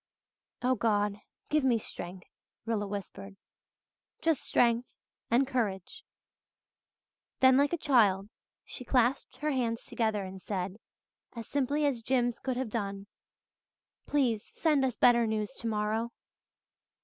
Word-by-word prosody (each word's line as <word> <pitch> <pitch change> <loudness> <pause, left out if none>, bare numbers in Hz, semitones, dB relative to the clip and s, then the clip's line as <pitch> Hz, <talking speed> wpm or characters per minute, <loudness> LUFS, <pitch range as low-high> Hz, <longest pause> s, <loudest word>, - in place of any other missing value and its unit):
"Oh 255 +1 +3
God, 210 -3 +1 0.3
give 305 -1 +2
me 250 -3 +4
strength," 180 -3 -7 0.4
Rilla 215 -3 -1
whispered. 200 0 -7 0.8
"Just 320 -5 +1
strength 235 0 +1 0.3
and 245 +4 +4
courage." 210 -8 -2 1.4
Then 260 0 +6
like 285 +2 +3
a 345 - 0
child 210 - +3 0.4
she - - -7
clasped 250 +1 +1
her 300 +1 -1
hands 235 -4 -1
together 220 -3 -1
and 190 0 -8
said, 190 0 -3 0.6
as 230 -2 -7
simply 285 +2 0
as 265 -5 0
Jims 245 0 +1
could 260 -2 -2
have 255 -4 -3
done, 200 -3 -3 1.0
"Please 245 -7 +1
send 300 -4 +1
us 255 -3 0
better 235 -2 +5
news 215 -1 -2
tomorrow." 220 +1 -1
230 Hz, 125 wpm, -30 LUFS, 205-260 Hz, 1.4 s, Then